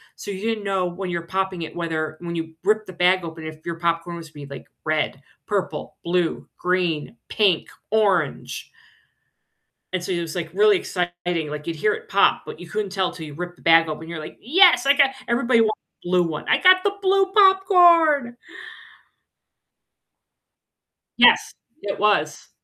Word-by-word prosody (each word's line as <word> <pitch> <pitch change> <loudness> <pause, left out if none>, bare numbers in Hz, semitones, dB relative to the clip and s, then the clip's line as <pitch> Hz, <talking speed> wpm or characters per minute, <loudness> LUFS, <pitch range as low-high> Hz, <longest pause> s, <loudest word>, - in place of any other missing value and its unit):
So 205 - -7
you 190 - -6
didn't 225 -1 -2
know 195 -2 -1
when 180 +1 -5
you 175 - -2
were 170 - -12
popping 190 -2 -2
it 160 - -8
whether 160 -2 -3
when 170 -1 -5
you 160 -1 -5
ripped 215 +1 +1
the 185 - -9
bag 180 +1 +2
open 160 -1 -8
if 155 0 -10
your 170 -1 -4
popcorn 170 0 -1
was 165 -2 -10
gonna 145 -2 -11
be, 140 - -8
like, 130 - -12 0.2
red, 155 -3 -1 0.3
purple, 205 -3 -3
blue, 175 -1 -1
green, 180 +1 -1
pink, 195 -6 +1 0.2
orange 195 -8 0 1.2
and 185 -1 -3
so 185 - -4
it 175 -1 -1
was, 165 -2 -6
like, 170 -1 -5
really 210 0 +4
exciting, 175 -3 -3
like, 150 +1 -7
you'd 165 - -3
hear 210 +7 +1
it - - -9
pop, 200 - +3
but - - -9
you 175 - -11
couldn't 210 0 -3
tell 190 -2 -1
till 160 - -9
you 150 - -10
ripped 175 +3 -7
the - - -21
bag 165 -1 +5
open, 155 +1 -6
you're 170 -1 -6
like, 155 - -9
"Yes, 315 - +5
I 280 - +5
got" 280 -2 +4 0.2
everybody 235 -1 +2
wanted 215 -1 +2 0.3
blue 180 0 +2
one, 160 -3 -5
"I - - +3
got 370 0 +6
the 405 - +1
blue 385 0 +2
popcorn!" 350 - +5 2.8
Yes, - - +5 0.3
it 200 -1 -4
was. 195 -8 0
180 Hz, 180 wpm, -22 LUFS, 165-215 Hz, 2.8 s, got